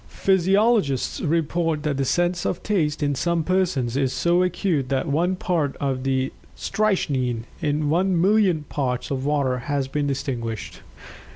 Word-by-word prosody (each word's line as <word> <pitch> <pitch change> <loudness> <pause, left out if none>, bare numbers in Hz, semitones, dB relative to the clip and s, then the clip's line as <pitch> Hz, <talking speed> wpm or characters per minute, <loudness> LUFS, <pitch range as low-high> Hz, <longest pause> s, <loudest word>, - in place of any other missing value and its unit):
Physiologists 195 - +2
report 165 -1 0
that 150 -3 -1
the 135 - 0
sense 175 +4 +1
of 180 - -2
Taste 155 -8 0
in 145 0 +1
some 170 +4 0
persons 165 -9 0
is 135 -2 +1
so 175 +4 +2
acute 175 -6 0
that 135 +3 0
one 170 +6 +1
part 165 -6 -1
of 135 -2 -1 0.6
strychnine 135 - 0 0.2
in 150 0 0
one 175 +3 +2
million 190 -4 +3
parts 130 -4 -3
of 135 0 -2
water 140 -4 +1
has 140 +1 -2
been 145 +1 -1
distinguished. 120 -5 -4
150 Hz, 145 wpm, -23 LUFS, 135-180 Hz, 0.6 s, million